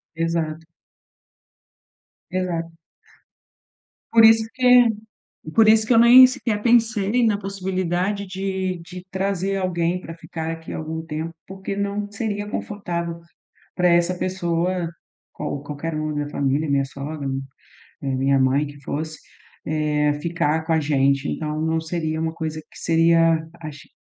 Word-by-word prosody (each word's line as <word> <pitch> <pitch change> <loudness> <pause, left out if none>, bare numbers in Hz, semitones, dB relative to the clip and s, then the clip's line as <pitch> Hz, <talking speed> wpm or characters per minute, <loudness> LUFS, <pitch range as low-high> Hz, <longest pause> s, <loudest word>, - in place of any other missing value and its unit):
Exato. 165 -1 -2 1.7
Exato. 175 -2 -2 1.4
Por 225 -1 +7
isso 225 0 +6
que 250 -1 +6 0.7
por 225 -1 +6
isso 220 0 +5
que 240 - +3
eu - - +6
nem 245 +3 +9
sequer 225 -4 -2
pensei 230 -1 +3
na 210 -2 +2
possibilidade 190 0 -2
de 190 -1 -3
de 180 +1 -10
trazer 195 0 -1
alguém 180 -2 0
pra 165 - -8
ficar 165 -1 -6
aqui 165 0 -7
algum 160 +1 -4
tempo, 160 +1 -5
porque 190 +1 -6
não 200 0 -2
seria 205 -1 -3
confortável 170 -6 -4 0.6
pra 180 -1 +3
essa 175 +1 +3
pessoa, 175 -1 -1 0.4
qual 140 - -5
qualquer 150 +2 -5
um 155 0 -2
da 145 0 -2
família, 145 +1 0
minha 140 -1 +2
sogra, 140 +2 -6
mi 135 0 -2 0.8
minha 135 +1 +2
mãe 135 +3 +2
que 145 0 -12
fosse, 155 +3 -4 0.5
eh, 150 -1 +1
ficar 160 -2 0
com 165 - +1
a 160 - +3
gente, 140 -2 +1
então, 155 0 -3
não 160 0 +1
seria 160 -1 -3
uma 160 0 -1
coisa 160 -1 -4
que - - -16
seria 165 -1 +3 0.2
aci 150 -3 -9
170 Hz, 135 wpm, -22 LUFS, 155-195 Hz, 1.7 s, nem